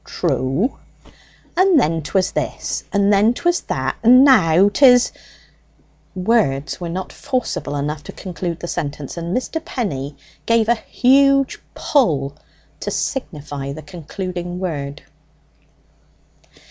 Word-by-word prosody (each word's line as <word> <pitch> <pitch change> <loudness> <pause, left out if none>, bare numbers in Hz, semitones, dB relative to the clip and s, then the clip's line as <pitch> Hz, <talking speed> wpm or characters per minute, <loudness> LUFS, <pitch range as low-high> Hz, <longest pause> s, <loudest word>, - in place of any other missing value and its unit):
"True." 135 - -1 0.8
"And 370 -4 +5
then 165 -5 +1
'twas 185 +6 0
this, - - -3
and 200 0 +3
then 215 +4 +4
'twas 350 +4 +1
that, - - -3
and 250 +4 +7
now 185 - +5
'tis 245 +3 +5 0.5
" - - -36 0.3
Words 180 -8 0
were 170 - -4
not 185 +2 -5
forcible 250 - -3
enough 145 +1 -3
to - - -7
conclude 175 -2 -5
the 175 - -5
sentence, 145 -3 -4
and 170 +3 -2
Mr. 320 +5 -4
Penny 145 - -4 0.3
gave 230 -1 +3
a 235 - +5
huge 275 +3 +3 0.2
pull 145 - +1 0.4
to - - -4
signify 145 - -4
the 155 +1 -9
concluding 175 +2 -6
word. 145 -6 -4
185 Hz, 120 wpm, -20 LUFS, 150-245 Hz, 0.8 s, and